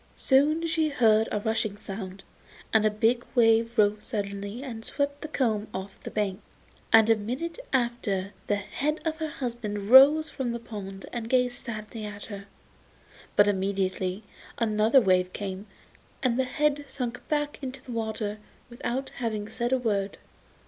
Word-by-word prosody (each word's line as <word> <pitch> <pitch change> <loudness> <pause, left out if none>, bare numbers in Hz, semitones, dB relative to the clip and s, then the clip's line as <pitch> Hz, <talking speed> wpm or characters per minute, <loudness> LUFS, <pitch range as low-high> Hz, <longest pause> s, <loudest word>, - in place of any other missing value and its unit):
Soon 300 +5 +3
she 320 -1 +1
heard 225 -5 +4
a 210 - 0
rushing 220 -2 -1
sound, 195 -2 -7 0.5
and 220 -1 +5
a - - +4
big 225 +3 +1
wave 230 0 +4
rose 210 0 +3
suddenly 200 +1 -4
and 230 -5 -6
swept 285 +3 -2
the - - -4
comb 220 -8 0
off 190 +1 -7
the - - -6
bank, 205 -2 -2 0.5
and 225 -1 +7
a 225 - +6
minute 255 - -4
after 235 -7 0
the 205 - +2
head 260 +10 -2
of 315 -1 -1
her 315 -1 -3
husband 230 -6 -4
rose 290 +4 +8
from 250 -4 -2
the 235 - -3
pond 200 -4 -8
and 230 -2 -4
gazed 250 -1 +1
sadly 215 -1 -6
at 205 -1 -7
her. 200 -2 -8 0.9
But 205 - +6
immediately 190 0 -1 0.3
another 220 +2 +4
wave 185 -3 +2
came, 195 0 -5 0.6
and 250 -1 +2
the 260 - +3
head 290 +2 0
sank 245 -3 -4
back 295 -1 -1
into 265 -1 -6
the 250 - -9
water 220 -2 -3 0.3
without 260 +2 -3
having 220 -3 -3
said 240 +1 -2
a 260 - +4
word. 205 -5 -1
225 Hz, 160 wpm, -27 LUFS, 205-255 Hz, 0.9 s, rose